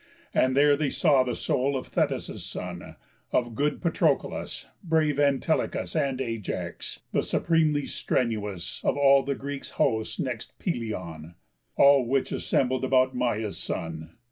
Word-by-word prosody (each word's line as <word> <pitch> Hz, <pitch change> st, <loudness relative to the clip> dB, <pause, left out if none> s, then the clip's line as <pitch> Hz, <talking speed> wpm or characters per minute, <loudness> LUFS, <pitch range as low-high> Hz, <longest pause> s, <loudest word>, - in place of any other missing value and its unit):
And 130 Hz, +1 st, +2 dB
there 145 Hz, 0 st, +6 dB
they 145 Hz, -1 st, 0 dB
saw 145 Hz, -4 st, +4 dB
the 125 Hz, -2 st, -1 dB
soul 135 Hz, +2 st, 0 dB
of 130 Hz, -, -5 dB
Thetis' -, -, -1 dB
son, -, -, -7 dB, 0.4 s
Of 120 Hz, -2 st, 0 dB
good 145 Hz, +6 st, -1 dB
Patroclus, 170 Hz, -, 0 dB, 0.2 s
brave 155 Hz, -4 st, +1 dB
Antilochus, 145 Hz, +4 st, +1 dB
And 140 Hz, -4 st, 0 dB
Ajax, 115 Hz, -5 st, -4 dB
the -, -, +2 dB
supremely 155 Hz, -3 st, +1 dB
strenuous 105 Hz, -7 st, -2 dB
Of -, -, +1 dB
all 140 Hz, -1 st, +6 dB
the 140 Hz, 0 st, -2 dB
Greek 140 Hz, 0 st, -5 dB
host 110 Hz, -5 st, 0 dB
next 125 Hz, -5 st, -4 dB
Pelëion; 90 Hz, -, -4 dB, 0.4 s
All 140 Hz, -3 st, +6 dB
which 135 Hz, +2 st, 0 dB
assembled 130 Hz, 0 st, 0 dB
about 130 Hz, 0 st, +3 dB
Maia's 110 Hz, -4 st, -1 dB
son. 80 Hz, -1 st, -5 dB
130 Hz, 135 wpm, -27 LUFS, 115-145 Hz, 0.4 s, there